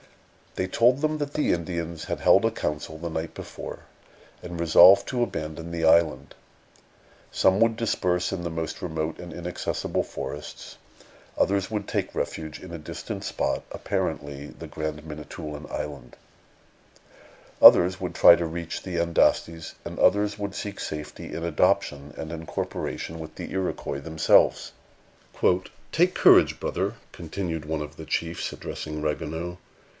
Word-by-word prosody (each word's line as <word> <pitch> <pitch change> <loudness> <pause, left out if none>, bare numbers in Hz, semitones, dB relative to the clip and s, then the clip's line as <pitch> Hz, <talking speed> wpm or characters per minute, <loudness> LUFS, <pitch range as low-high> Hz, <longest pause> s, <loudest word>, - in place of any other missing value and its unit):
They 95 - -1
told 120 +7 +3
them 155 0 0
that 145 -1 -3
the 150 - +2
Indians 85 -1 -4
had - - -3
held - - +5
a - - +2
council 75 +1 -4
the 85 +1 -5
night 80 0 -4
before, - - -8 0.6
and 85 -1 -7
resolved 85 +4 +7
to 125 -1 +1
abandon 80 -5 -5
the 85 -1 -1
island. 80 -1 +3 1.0
Some 95 +1 +3
would 115 -1 +3
disperse 90 -6 0
in 90 -2 -4
the 85 - -2
most 80 -1 -4
remote 80 -2 -3
and 90 -1 -8
inaccessible 85 +2 -2
forests; 75 +3 -7 0.6
others 100 -1 +1
would 105 -2 -3
take - - -2
refuge 80 -1 -4
in 95 - -10
a 85 - -5
distant 75 - -6
spot, - - -1
apparently 70 0 -3
the - - -10
Grand 75 -1 -5
Manitoulin 75 0 -7
Island; 75 -2 -6 1.4
others 90 +1 +8
would 90 -2 -4
try 85 - +9
to 85 0 -2
reach 85 0 -5
the 90 -2 -4
Andastes; 85 -1 +1
and - - -6
others 105 0 +3
would 100 -1 -4
seek 100 -1 -5
safety 75 -1 -6
in 85 - -5
adoption 75 -3 +1
and 80 0 -6
incorporation 80 0 -4
with 80 -1 -8
the - - -7
Iroquois 90 -6 -2
themselves. 80 +1 +3 1.2
"Take - - +3
courage, - - +6
brother," - - -2 0.2
continued 85 -2 -4
one 80 0 -2
of 75 0 -8
the 80 - -8
chiefs, 80 +2 -2
addressing 75 -1 -6
Ragueneau. 80 +3 -3
85 Hz, 145 wpm, -26 LUFS, 80-90 Hz, 1.4 s, try